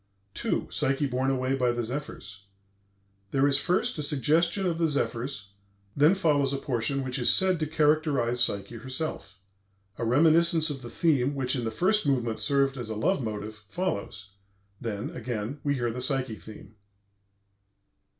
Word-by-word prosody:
II. - - 0
PSYCHE 135 0 0
BORNE 130 +2 0
AWAY 130 0 0
BY 125 -3 +1
THE 120 0 -2
ZEPHYRS 110 -6 -6 0.8
There 135 +4 +2
is 140 -1 +6
first 185 +4 0
a - - 0
suggestion 155 - +1
of 170 -2 -1
the 165 -1 +2
zephyrs; 120 -6 -2 0.5
then 150 +6 +5
follows 145 -7 +2
a - - 0
portion 135 +1 -1
which 130 +1 -3
is 120 - +4
said 185 -3 +3
to 155 - -1
characterize 150 -6 +2
Psyche 100 +1 -1
herself. 130 -4 -4 0.6
A - - -2
reminiscence 160 +5 +4
of 135 -2 -6
the 120 - -8
theme 145 -4 +1
which, 130 -1 0
in 120 -3 -2
the - - 0
first 185 - +1
movement, 120 -5 0
served 140 -1 +1
as 120 -3 -5
a 110 - -3
love 135 - 0
motive, 105 -1 -6
follows; 105 - -4 0.5
then, 105 -2 -4
again, 120 +3 -5
we 145 -1 +1
hear 120 -3 -1
the 125 +2 -5
Psyche 130 -3 -1
theme. 110 0 -12
135 Hz, 160 wpm, -27 LUFS, 120-150 Hz, 0.8 s, is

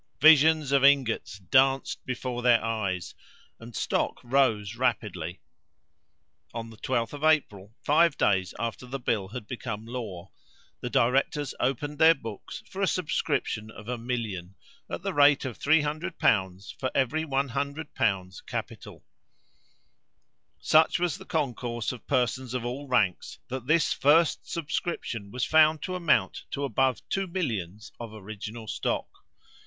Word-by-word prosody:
"Visions 155 -1 +6
of 140 -1 +4
ingots 135 -7 +3
danced 135 +8 +2
before 125 -1 -3
their 120 -2 +4
eyes," 100 -6 -2 0.5
and 115 0 -11
stock - - -1
rose 120 -5 +1
rapidly. 105 -8 -2 1.1
On 115 -1 -5
the 110 - -14
12th 115 -2 -1
of 145 +1 -7
April, 110 -10 +1
five 160 +1 +4
days 95 -2 +2
after 115 +2 -4
the 135 +2 -4
bill 105 -5 -1
had 110 +2 -7
become 115 -2 -5
law, 110 -7 -6 0.5
the - - -4
directors 135 +3 +1
opened 145 +3 -1
their 165 0 +7
books 115 -7 -8
for 195 - -6
a 195 - +3
subscription 145 -10 -1
of 105 0 -12
a 125 - -2
million, 110 -7 -4 0.3
at - - -5
the - - -2
rate 145 -1 +5
of 125 -4 -5
300l. 145 - +1
for 130 - -1
every 135 +4 +1
100l. 135 - -2
capital. - - -6 1.5
Such 155 +1 +4
was 175 -4 -1
the - - -11
concourse 120 -6 -2
of 125 - -11
persons 125 0 0
of 120 -2 -2
all 135 +4 -4
ranks, 105 -8 0
that 130 -1 -5
this 155 +1 +3
first 155 +3 +3
subscription 145 -9 -3
was 125 +3 -2
found 155 -1 +4
to 185 - -3
amount 175 -4 +1
to 140 - -3
above 130 0 0
two 195 -1 -1
millions 110 - -4
of 115 -2 -7
original 110 +2 -8
stock. - - -2
125 Hz, 140 wpm, -27 LUFS, 110-145 Hz, 1.5 s, their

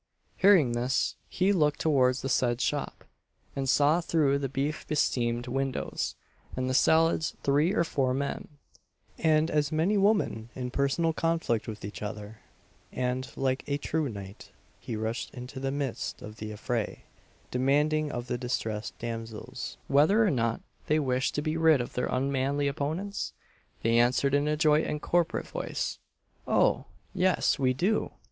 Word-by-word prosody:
Hearing 185 -10 +5
this, 120 +2 0
he 190 +2 +2
looked 150 -5 +2
towards 130 -4 +2
the - - -1
said 125 -2 +1
shop, - - -2 0.5
and 135 -1 -1
saw 150 +6 +4
through 150 -4 +2
the 135 -1 -2
beef 140 +3 -2
besteamed 120 -5 0
windows 135 +1 -2 0.4
and 130 0 -1
the 130 - 0
salads 160 +3 +3
three 145 +5 +3
or 190 - +3
four 135 -6 0
men, 140 +2 -2 0.7
and 160 0 +3
as 150 -1 +1
many 175 +7 +2
women, 195 - +1
in 125 -1 -4
personal 140 +5 +1
conflict 165 -9 0
with 105 -3 -6
each 105 - -7
other; 105 0 -6 0.5
and, 125 0 -2
like 130 0 0
a 140 - 0
true 150 0 -1
knight, 100 -2 -9 0.3
he 115 - -5
rushed 110 +2 -3
into 125 +2 -7
the 135 0 -2
midst 140 -2 -3
of 105 +1 -9
the 110 -1 -6
affray, 110 +1 -3 0.5
demanding 145 +4 +2
of 120 0 -4
the 125 -1 -3
distressed 110 -3 -3
damsels 115 -2 -6
whether 160 +11 +4
or 205 - +3
not 115 -4 0 0.3
they 155 - +3
wished 130 -3 0
to 145 - -1
be 155 0 -1
rid 160 -3 +5
of 120 - -4
their 125 - -1
unmanly 135 +2 0
opponents? 160 +8 -3 0.5
They 115 +1 +4
answered 130 +3 +3
in 145 +1 +2
a 150 0 +1
joint 155 0 +3
and 150 - -2
corporate 175 +2 0
voice - - -3 0.5
"Oh! - - +3 0.3
yes, 185 -4 +2
we 130 -1 +2
do!" 195 - +1
135 Hz, 155 wpm, -28 LUFS, 125-155 Hz, 0.7 s, Hearing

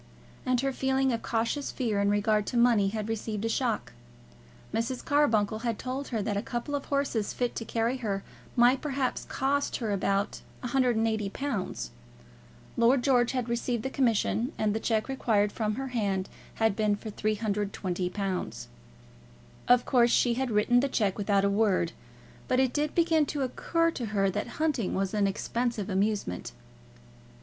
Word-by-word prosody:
And 255 -1 +2
her 270 0 0
feeling 265 0 +1
of 230 - -2
cautious 235 +5 -1
fear 220 -6 -1
in 200 - +2
regard 205 0 +2
to 245 - -1
money 235 -4 +4
had 215 +1 -3
received 220 -1 -3
a - - 0
shock. 235 -2 -1 0.8
Mrs. 240 +3 -2
Carbuncle 220 -8 +2
had 230 -2 -2
told 260 +2 -4
her 225 -4 -2
that 205 0 -1
a 200 - 0
couple 240 +5 -4
of 285 -1 -2
horses 275 -7 -1
fit 245 -1 -1
to 225 - -4
carry 230 +4 0
her 200 -5 -2 0.3
might 245 +2 +5
perhaps 270 -3 -2
cost 280 +2 0
her 225 -4 -2
about 200 0 0 0.2
£180. 225 - 0 0.9
Lord 245 +2 +4
George 245 -2 +3
had 250 -2 -1
received 235 -1 -1
the 265 - -3
commission, 240 0 +1
and 215 -1 +1
the 220 - -1
cheque 220 -1 0
required 220 -6 +1
from 215 -1 -1
her 270 +1 -4
had 200 0 -1
been 210 -1 +2
for 215 +1 -7
£320. 200 - -2 1.0
Of 245 0 +5
course 240 -3 +4
she 240 0 +3
had 260 +1 -1
written 225 +3 +3
the 275 +2 +1
cheque 210 -6 0
without 200 -1 +2
a - - +4
word, 200 -5 +2 0.6
but 255 - +2
it 260 -2 +2
did 300 0 -1
begin 325 -3 +3
to 285 -1 -2
occur 330 +6 0
to 245 -7 -4
her 195 -2 +1
that 205 +3 -3
hunting 300 -10 0
was 195 0 -1
an 205 -2 +2
expensive 220 +1 -2
amusement. 195 - -1
230 Hz, 160 wpm, -28 LUFS, 205-255 Hz, 1.0 s, might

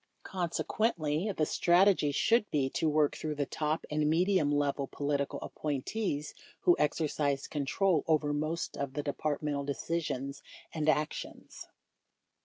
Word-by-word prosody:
Consequently, 175 -1 -1
the 155 -5 0
strategy 175 -2 +4
should 225 - +2
be 135 -3 0
to 160 - +1
work 150 -1 +2
through 155 -1 -3
the 145 -1 -1
top 155 +3 -2
and 150 0 +1
medium 175 -1 +3
level 145 -1 0
political 140 0 -2
appointees 150 - -3 0.3
who 355 - +5
exercise 145 -2 0
control 155 +3 +1
over 150 -2 +2
most 155 +3 -2
of 140 -1 -4
the 145 - -3
Departmental 145 0 -2
decisions 140 -2 -3 0.3
and 155 -1 0
actions. 150 0 -2
150 Hz, 125 wpm, -31 LUFS, 145-165 Hz, 0.3 s, who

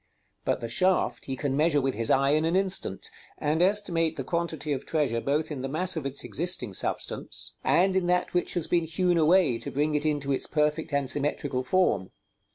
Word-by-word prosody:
But - - 0
the 115 - -3
shaft 175 -3 +1
he 135 - -3
can 135 0 -2
measure 150 0 +3
with 135 -1 0
his 115 +1 0
eye 135 +1 +3
in 155 +1 +2
an 165 +2 +1
instant, 190 - 0 0.3
and 155 +2 0
estimate 175 -4 +2
the 135 - -4
quantity 160 -1 -2
of 130 - -4
treasure 140 -8 0
both 150 +5 -1
in 140 -4 -4
the 135 - -4
mass 180 +6 0
of 150 -4 -2
its 135 0 0
existing 165 - 0
substance, - - -3
and 190 +2 +3
in 185 -2 +1
that 180 0 +1
which 175 - 0
has 175 -3 0
been 170 -2 +1
hewn 175 +1 +1
away 160 -6 +4
to - - -5
bring 150 +2 0
it 150 -1 0
into 145 -3 -1
its 135 - 0
perfect 150 +1 0
and 140 -1 0
symmetrical 140 -1 -1
form. 125 - +1
150 Hz, 205 wpm, -27 LUFS, 135-175 Hz, 0.3 s, away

